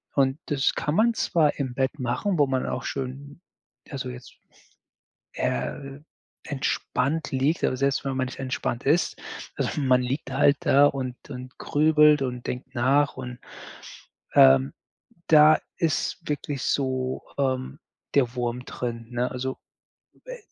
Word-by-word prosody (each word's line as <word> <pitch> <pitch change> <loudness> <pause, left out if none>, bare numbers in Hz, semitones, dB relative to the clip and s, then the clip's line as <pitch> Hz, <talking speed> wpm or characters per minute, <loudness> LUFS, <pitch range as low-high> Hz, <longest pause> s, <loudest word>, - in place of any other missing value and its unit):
Und 135 +2 +2
das 140 -3 +1
kann 150 +3 -1
man 230 +2 +4
zwar 160 -8 +2
im 130 -3 -3
Bett 135 +2 -1
machen, 130 +9 -1
wo 145 - +5
man 130 -1 -1
auch 125 - -3
schön 140 +3 -5 0.5
also 130 -3 -5
jetzt, 125 0 -10 1.0
äh, 135 - -3 0.5
entspannt 140 +1 -1
liegt. 135 +5 0
Aber 130 - +1
selbst 140 +1 +1
wenn 135 -1 -2
man 130 - +1
nicht 130 - -9
entspannt 130 -2 -3
ist 160 +5 +2 0.4
also - - -2
man 130 -2 +4
liegt 130 +1 -3
halt 140 +1 +4
da 145 -3 +5
und 130 -3 -3
und 130 -1 -9
grübelt 150 -1 +4
und 125 -1 -4
denkt 130 +2 -5
nach 135 +3 +2
und, 125 -1 -6 1.0
ähm, 65 +1 +6 0.6
da 155 0 +7 0.2
ist 165 +1 0
wirklich 145 -1 -3
so, 130 -2 -1 0.2
ähm, 130 0 -1 0.4
der 125 -4 +3
Wurm 120 +1 -2
drin, 115 -2 -5
ne? 120 +1 -1
Also 130 +1 -4 0.7
we - - -8
135 Hz, 140 wpm, -25 LUFS, 125-145 Hz, 1.0 s, da